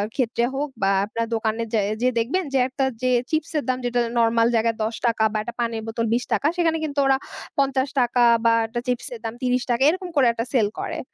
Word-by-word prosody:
ক্ষেত্রে 235 -2 0
হোক 290 +2 -2
বা 195 - +3 0.2
আপনার 230 +2 -3
দোকানে 220 0 -1
যা 220 - +3 0.2
যেয়ে 255 +1 +2
দেখবেন 280 +12 0
যে - - +3
একটা 265 +1 -1 0.2
যে 255 0 +1 0.2
চিপসের 315 -1 -1
দাম 255 - +1
যেটা 245 0 0 0.2
নরমাল 230 0 +3
জায়গায় 230 0 +2
৳১০ 225 0 0
বা - - 0
একটা 215 +3 -5
পানির 230 -1 -1
বোতল 230 +1 -2
৳২০, 245 +4 0
সেখানে 325 -2 +2
কিন্তু 290 -2 -2
ওরা 270 0 +4 0.4
৳৫০ 265 -2 +1 0.2
বা 230 - +5
একটা 235 +2 -4
চিপসের 250 - -3
দাম 225 - -4
৳৩০ 250 -1 0
এরকম 365 +2 -2
করে 270 -4 +5
একটা 230 0 -3
সেল 220 -6 +3
করে। - - -4
245 Hz, 195 wpm, -23 LUFS, 230-275 Hz, 0.4 s, বা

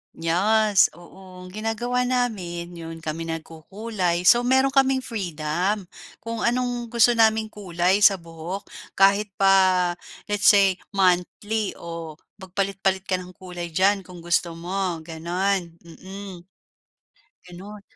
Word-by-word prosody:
Yes, 200 +5 +3
oo. 180 +1 -14
Ang 180 - -11
ginagawa 230 +4 -1
namin, 190 -9 -2
'yon 165 -1 -9
kami 165 +1 -4
nagkukulay, 175 +3 -3
so 240 +6 +5
meron 265 +1 +3
kaming 265 -1 +2
freedom 185 - -2 0.4
kung 230 0 -4
anong 245 0 -1
gusto 235 +1 +4
naming 220 -2 +2
kulay 185 -1 0
sa 200 -1 +6
buhok. 170 +2 -7 0.3
Kahit 200 +2 +4
pa 190 -2 +4 0.4
let's 205 0 +1
say 195 -3 +5 0.2
monthly 195 +3 0
o 165 -2 -8 0.2
magpalit-palit 190 0 -1
ka 185 -2 -1
ng 180 0 -11
kulay 180 -2 -7
diyan 195 +1 +2
kung 180 -2 -11
gusto 170 0 0
mo, 175 -1 -3
gano'n, 175 +2 -2
mm. 190 +3 -10 1.1
Ganun. 200 +4 -10
190 Hz, 120 wpm, -24 LUFS, 175-215 Hz, 1.1 s, sa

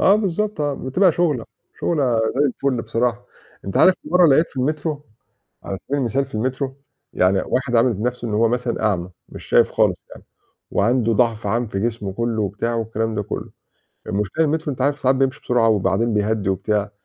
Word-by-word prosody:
آه 195 - +6
بالضبط، 210 -2 -1
آه، 145 -1 0
بتبقى 170 +9 +2
شُغلة، 150 -8 0 0.4
شُغلة 135 -8 +1 0.2
زي 135 - 0
الفُل 130 -2 -1
بصراحة. 120 +2 -1 0.4
أنت 95 - -4
عارف 185 - +6
في - - -10
مرّة 180 0 +6
لقيت 155 +3 +4
في - - -22
المترو 150 +2 -2 0.6
على 95 - -4
سبيل 145 +8 -3
المثال 135 +2 0
في - - -15
المترو 130 +4 -2 0.4
يعني 95 +1 +2
واحد 125 -1 0
عامل 115 +2 +4
بنَفْسه 120 +3 -3
إن 105 - -2
هو 115 +2 +3
مثلًا 120 0 -2
أعمى 90 -4 -1 0.2
مش - - -11
شايف - - +4
خالص - - +1
يعني - - -13 0.5
وعنده 115 +2 +2
ضَعْف 115 -1 +1
عام 115 +4 0
في 95 -2 -3
جسمه 110 -3 -2
كلّه 115 +1 -1
وبتاعه 105 +4 -2
والكلام 110 0 -2
ده 105 - -1
كلّه، - - -6 0.6
المشكلة 105 +11 0
المترو 155 0 -1
أنت 130 - -4
عارف 145 +2 +1
ساعات 130 +1 +3
بيمشي 135 +1 0
بسرعة 120 -2 +2
وبعدين 110 +2 +1
بيهّدي 105 -1 0
وبتاع، 100 +2 0
120 Hz, 185 wpm, -21 LUFS, 110-140 Hz, 0.6 s, آه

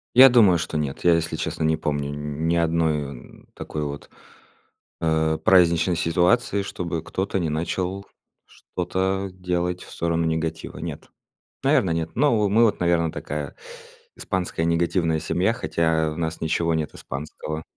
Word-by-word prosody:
Я 130 +2 +10
думаю, 110 -8 +5
что 80 0 -3
нет. 75 -3 -3
Я 85 -1 +6
если 80 0 -1
честно - - -3
не 80 0 +2
помню 75 -2 -2
нь 75 +2 -3
ни 85 - +2
одной 80 -3 +1
о - - -6
н - - -14
такой 75 -1 -5
вот, 70 0 -7 0.9
э, 80 -1 +1
праздничной 90 -1 +4
ситуации, 90 +4 +2
чтобы 85 -4 -4
кто-то 95 +2 -2
не 85 -3 -1
начал 90 +5 -2 0.4
что-то 95 +1 -3
делать 90 -1 -2
в - - -14
сторону 85 0 -1
негатива. 80 0 -3
Нет, - - -7 0.5
наверно, 90 - +3
нет. 80 0 -2
Но 130 -2 +3
во 105 - +2
мы 110 +4 +4
вот 110 - +1
наверно 85 -2 +2
такая 75 -1 -5 0.6
испанская 90 -3 -2
негативная 85 -1 +1
семья, 90 +7 +1
хотя 80 -4 0
в 75 - -7
нас 80 -1 -3
ничего 85 +1 0
нет 80 -1 -2
испанского. 75 +2 -6
85 Hz, 155 wpm, -24 LUFS, 80-90 Hz, 0.9 s, Я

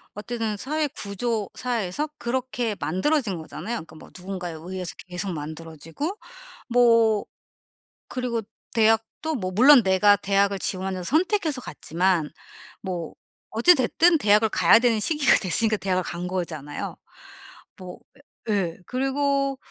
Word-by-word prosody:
어쨌든 215 0 -3
사회 300 +6 -1
구조 210 -1 -3
사이에서 245 +2 -2
그렇게 245 -2 -2
만들어진 200 - 0
거잖아요. 225 +8 -5
그니까 160 0 -10
뭐 155 - -13
누군가에 180 -2 -6
의해서 180 +3 -6
계속 180 +2 -4
만들어지고 160 - -6 0.5
뭐 230 -3 +4 0.8
그리고 245 -3 -2 0.3
대학도 225 +8 +1
뭐 185 -5 -3
물론 255 +4 +7
내가 200 +2 +4
대학을 200 0 +1
지원해서 185 -1 -3
선택해서 320 - +1
갔지만 170 -2 -1 0.5
뭐 175 -4 -5 0.4
어찌됐든 320 +6 +4
대학을 210 -1 +4
가야 225 - +5
되는 230 -2 +2
시기가 295 +3 +4
됐으니까 215 +3 +1
대학을 185 -2 -1
간 175 +1 -5
거잖아요. 160 -6 -5 0.8
뭐 180 -1 -10 0.5
예 - - +2
예. 175 -4 -1
그리고 275 +1 0
210 Hz, 300 characters per minute, -24 LUFS, 185-250 Hz, 0.8 s, 물론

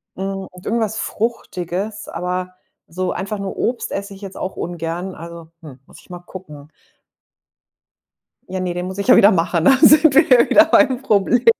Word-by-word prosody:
Hm, 195 0 -5
und 180 0 -15
irgendwas 220 -1 -1
Fruchtiges, 210 -3 -4
aber 180 +1 -4 0.3
so 180 +2 -4
einfach 200 +2 -5
nur 195 -1 -6
Obst 240 0 -2
esse 200 0 -5
ich 195 - -14
jetzt 195 -1 -9
auch 185 - -5
ungern, 175 +2 -5
also, 170 0 -10
hm, 140 -5 -13
muss - - -16
ich - - -25
mal 175 - -8
gucken. 150 -5 -12 1.8
Ja, 185 - -4
ne, 180 -1 -3
den 180 +1 -4
muss 190 +1 -7
ich 200 - -4
ja - - +7
wieder 200 - +6
machen, 170 -1 0
da 265 +4 +6
sind 305 -1 +6
wir 310 +3 +5
ja 250 -2 +5
wieder 315 - +6
beim 265 -5 +3
Problem. 235 +1 +1
190 Hz, 180 wpm, -19 LUFS, 175-220 Hz, 1.8 s, ja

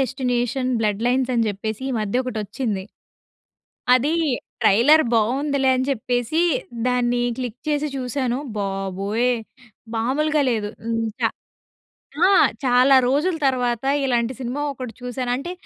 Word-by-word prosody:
Destination 255 -1 -1
blood 210 -1 0
lines 255 +1 +1
అని 230 -1 +2
జెప్పేసి 220 +3 -4
ఈ - - -2
మధ్య 215 +5 0
ఒకటొచ్చింది. 215 -3 -3 1.1
అదీ 255 +4 +3 0.5
ట్రైలర్ 290 +10 +5
బావుందిలే 265 +5 +1
అని 255 0 0
జెప్పేసి, 245 +3 -1 0.5
దాన్ని 245 -1 +1 0.2
క్లిక్ 245 -2 -5
చేసి 300 0 0
చూసాను. 250 -1 -2 0.2
బాబోయ్! 195 +4 -1 0.6
మామూలుగా 295 +7 +1
లేదు. 215 -3 -1 0.2
హ్మ్. 230 0 -1 0.2
చా - - +3 1.0
ఆ! - - +4 0.3
చాలా 255 +1 +5
రోజుల 300 +7 +1
తర్వాత 245 -2 0 0.2
ఇలాంటి 240 -1 0
సినిమా 260 +3 -3
ఒకటి 255 -3 -7
చూసాను. 250 0 -3
అంటే 340 +6 -5
250 Hz, 120 wpm, -22 LUFS, 225-265 Hz, 1.1 s, ట్రైలర్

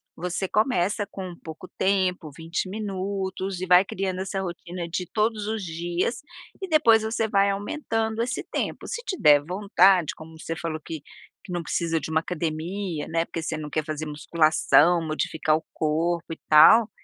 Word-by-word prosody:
você 180 +3 -3
começa 205 -2 +1
com 185 -3 -7
pouco 160 +3 -9
tempo, 185 -4 +1
20 165 +3 -3
minutos 195 -2 -4
e - - -1
vai 180 +1 +7
criando 190 -1 -3
essa 195 0 -3
rotina 175 -1 -6
de 180 +1 -3
todos 215 -1 0
os 220 -1 -2
dias 175 +5 -2 0.4
e 380 - -3
depois 235 -9 +5
você 220 0 -1
vai 200 -1 +3
aumentando 220 +1 -2
esse 245 +2 -2
tempo. - - -4
Se 470 - -4
te 375 - -3
der 145 -1 +6
vontade 185 -1 +3
como 160 0 -12
você 165 - -4
falou 160 -1 -4
que 160 -3 -6 0.4
que - - -9
não 175 - -1
precisa 165 -1 -1
de - - -6
uma 160 0 +2
academia, 165 +1 -3
né, 165 0 0
porque 165 - -5
você 160 - -3
não 150 -1 -6
quer 155 +1 -1
fazer 155 0 -4
musculação 155 +2 +3
modificar 155 0 0
o 160 - -10
corpo 165 +2 -1
e - - -12
tal. 205 +9 +8
180 Hz, 175 wpm, -25 LUFS, 160-200 Hz, 0.4 s, tal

